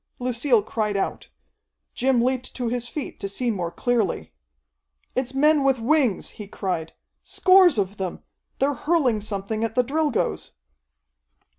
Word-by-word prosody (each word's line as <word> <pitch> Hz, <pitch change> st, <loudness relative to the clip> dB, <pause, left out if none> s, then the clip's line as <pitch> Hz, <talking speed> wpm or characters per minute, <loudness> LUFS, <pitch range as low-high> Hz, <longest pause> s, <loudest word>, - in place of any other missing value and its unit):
Lucille 245 Hz, -2 st, +1 dB
cried 210 Hz, -2 st, -2 dB
out. 195 Hz, -, -3 dB, 0.6 s
Jim 255 Hz, -1 st, +2 dB
leaped 255 Hz, 0 st, -1 dB
to 245 Hz, -2 st, -2 dB
his 245 Hz, 0 st, -3 dB
feet 290 Hz, +4 st, -6 dB
to 200 Hz, -, -3 dB
see 240 Hz, +4 st, -1 dB
more 180 Hz, -5 st, -2 dB
clearly. 220 Hz, -, -1 dB, 0.8 s
"It's 255 Hz, 0 st, -2 dB
men 300 Hz, +1 st, +4 dB
with 270 Hz, -1 st, +3 dB
wings," 245 Hz, -, +1 dB
he 205 Hz, -, -7 dB
cried. 180 Hz, -5 st, -3 dB, 0.3 s
"Scores 370 Hz, -6 st, +5 dB
of 200 Hz, 0 st, -1 dB
them. 185 Hz, -2 st, -5 dB, 0.3 s
They're 280 Hz, +2 st, +1 dB
hurling 270 Hz, -6 st, +1 dB
something 210 Hz, +1 st, -3 dB
at 225 Hz, 0 st, -2 dB
the 250 Hz, -, +4 dB
Drilgoes!" 280 Hz, -, -1 dB
240 Hz, 140 wpm, -24 LUFS, 205-270 Hz, 0.8 s, Scores